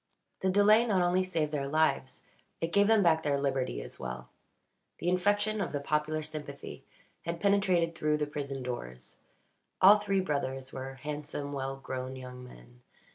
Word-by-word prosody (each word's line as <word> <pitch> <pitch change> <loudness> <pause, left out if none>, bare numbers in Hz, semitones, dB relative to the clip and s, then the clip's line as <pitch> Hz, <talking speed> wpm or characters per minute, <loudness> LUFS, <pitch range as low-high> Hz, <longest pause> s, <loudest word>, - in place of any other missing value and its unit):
The 190 - +1
delay 205 +4 +6
not 190 -5 +3
only 180 +1 +2
saved 165 -5 -1
their 140 -2 -2
lives, 155 -3 0 0.4
it 165 0 -2
gave 200 0 +5
them 220 -2 +5
back 160 -2 +4
their 145 -2 +1
liberty 130 - -1
as - - -10
well. 60 0 -6 0.7
The - - -4
infection 205 +3 +1
of 185 - -2
the 145 - 0
popular 150 +2 -1
sympathy 150 -2 -8 0.4
had 170 0 -3
penetrated 185 -4 +2
through 150 -2 +1
the 150 - 0
prison 140 -2 -5
doors. 65 - -6 0.6
All 205 +3 +8
three 195 -1 0
brothers 135 -6 -2
were 135 0 -6
handsome, 145 +1 -5
well 135 -1 -3
grown 130 -1 -5
young 125 -1 -9
men. - - -15
150 Hz, 165 wpm, -30 LUFS, 135-185 Hz, 0.7 s, All